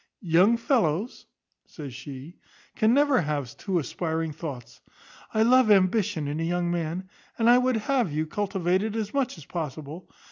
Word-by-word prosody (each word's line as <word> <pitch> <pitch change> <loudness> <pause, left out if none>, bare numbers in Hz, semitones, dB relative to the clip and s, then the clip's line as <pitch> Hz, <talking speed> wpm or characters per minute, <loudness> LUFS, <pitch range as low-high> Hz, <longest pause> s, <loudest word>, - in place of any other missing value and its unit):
Young 185 +7 +4
fellows," 230 - 0 0.4
says 145 -5 -9
she, 140 +5 -10 0.4
"can 220 +1 +3
never 280 -1 +4
have 145 -5 -3
too 190 -3 -2
aspiring 160 +1 -2
thoughts. 125 -6 -8 0.5
I 220 - +2
love 250 0 +5
ambition 190 -4 +2
in 145 +2 -3
a - - -1
young 175 +1 0
man, 175 +2 -3 0.3
and 230 - +2
I 245 +1 +7
would 255 -1 +1
have 235 - 0
you 155 +2 -1
cultivate 190 +1 0
it 220 0 -3
as 215 -2 -3
much 275 -8 -1
as 155 - -12
possible. 155 0 -6
175 Hz, 165 wpm, -26 LUFS, 155-220 Hz, 0.5 s, I